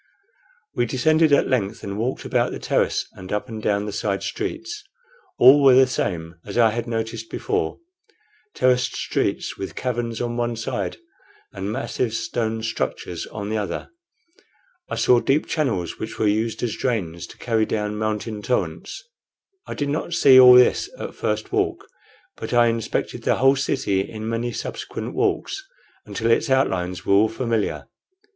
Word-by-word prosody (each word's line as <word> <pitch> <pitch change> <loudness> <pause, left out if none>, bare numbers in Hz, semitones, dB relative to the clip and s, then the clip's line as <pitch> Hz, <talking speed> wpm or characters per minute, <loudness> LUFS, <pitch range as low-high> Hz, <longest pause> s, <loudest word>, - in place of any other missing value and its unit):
We 120 0 0
descended 155 +6 +3
at 140 - +4
length 110 -5 -1
and 100 0 -4
walked 115 +5 -2
about - - +1
the - - -4
terrace - - 0
and 95 0 -10
up 105 +4 -2
and 110 -3 -7
down 100 -1 0
the 105 - -4
side 100 -1 -2
streets. 360 +1 -4 0.5
All 135 +4 +8
were 135 -2 +7
the 130 0 +7
same 85 -9 -3
as 100 - -6
I 115 -2 +5
had 120 +2 -3
noticed 115 0 -4
before 425 0 -2 0.8
terraced 125 -1 +2
streets, - - -2
with 95 - -5
caverns 120 -2 -2
on 120 0 -2
one 120 0 -1
side 115 0 -3 0.6
and 100 +1 -4
massive 120 -1 -2
stone 110 -1 -2
structures 110 -12 -3
on 105 -1 -6
the 110 - 0
other. 100 -5 -4 1.0
I - - -2
saw 125 - +4
deep 140 +5 +1
channels, 110 - -2
which 110 - -6
were - - 0
used 110 +3 0
as 120 - -1
drains 90 -10 -2
to - - -14
carry 115 -2 0
down 105 -1 -2
mountain 110 0 -3
torrents. 125 - -2 0.6
I - - -5
did 145 -1 -2
not 160 +3 -2
see 130 -5 +7
all 125 -1 +10
at 125 - +10
this - - -1 0.2
first 105 0 -2
walk, - - -1 0.5
but - - -5
I 120 -1 +5
inspected 115 -1 -2
the - - +2
whole 135 +1 +4
city 100 -7 0
in 110 +2 -6
many 115 +1 -2
subsequent - - -5
walks - - -1 0.4
until 115 0 -1
its - - +2
outlines 90 -9 0
were - - +2
all 105 +3 +5
familiar. 115 -2 -2
115 Hz, 165 wpm, -23 LUFS, 105-125 Hz, 1.0 s, all